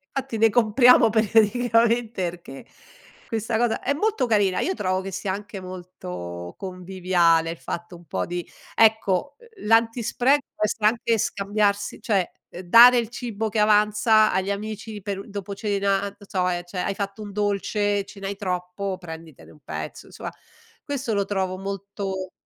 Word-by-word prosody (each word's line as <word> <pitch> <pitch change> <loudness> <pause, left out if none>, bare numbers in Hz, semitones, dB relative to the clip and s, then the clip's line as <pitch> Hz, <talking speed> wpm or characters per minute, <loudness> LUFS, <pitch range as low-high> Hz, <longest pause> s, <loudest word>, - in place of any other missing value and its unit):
Infatti 240 -4 -3
ne 225 +1 +5
compriamo 235 +2 +5
periodicamente 230 -1 +2
perché 170 -6 -11 0.6
questa 225 0 -1
cosa 235 -1 0
è 280 - 0
molto 420 - 0
carina. 205 -4 +2
Io 375 - 0
trovo 185 -1 -1
che 195 0 -6
sia 190 +1 -3
anche 205 0 -7
molto 90 - -8
conviviale 180 -3 +1
il 170 - -7
fatto 175 +1 -6
un 170 - -18
po' - - -2
di 175 0 -5 0.3
ecco 220 +3 +3
l 460 - -15
l'antispreco 235 +4 +3
può - - -3
essere 210 0 0
anche 230 0 +1
scambiarsi, 205 0 0
cioè, 195 -5 0 0.3
dare 240 +7 +8
il 230 -2 0
cibo 225 -3 -4
che 215 - -2
avanza 210 +1 +4
agli 190 +2 0
amici 215 +1 -5
per 200 0 -5
dopo 200 0 -6
cena, 200 -1 0
non 200 0 -5
so, 185 -1 0 0.2
cioè, 180 +1 -7
hai 195 - -2
fatto 200 +1 -5
un 205 -1 -7
dolce, 205 0 0
ce 200 - -13
ne 195 - -3
hai 200 - -3
troppo, 185 0 -3
prenditene 160 -4 -11
un 150 - -18
pezzo, - - -6
insomma - - -7 0.5
questo 275 -6 -2
lo 200 -1 +1
trovo 190 -2 -2
molto 195 -1 -5
200 Hz, 160 wpm, -24 LUFS, 185-225 Hz, 0.6 s, dare